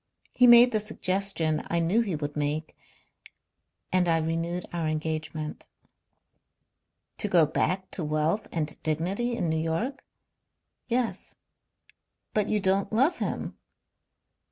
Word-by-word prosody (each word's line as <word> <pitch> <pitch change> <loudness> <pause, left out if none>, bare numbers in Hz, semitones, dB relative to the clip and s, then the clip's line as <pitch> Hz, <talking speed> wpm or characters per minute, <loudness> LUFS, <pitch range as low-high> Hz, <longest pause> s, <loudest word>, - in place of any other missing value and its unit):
He 250 - +5
made 240 +1 +8
the 215 - +1
suggestion 190 -6 0
I 170 - -1
knew 170 +7 +2
he 200 -7 -2
would 145 -1 -4
make, 150 +1 -2 1.2
and 185 -1 +2
I 165 -1 +3
renewed 165 +2 -2
our 170 -2 -1
engagement." 155 0 -4 1.5
"To 210 - 0
go 175 -5 +5
back 185 +5 -1
to 175 - -2
wealth 155 +7 0
and 155 -2 -3
dignity 190 +10 -1
in 175 - -1
New 160 0 0
York?" 190 - -2 0.8
"Yes." 245 -1 -2 1.0
"But 210 -1 +1
you 210 - +2
don't 195 0 +1
love 270 +11 +2
him?" - - -4
175 Hz, 125 wpm, -27 LUFS, 155-210 Hz, 1.5 s, made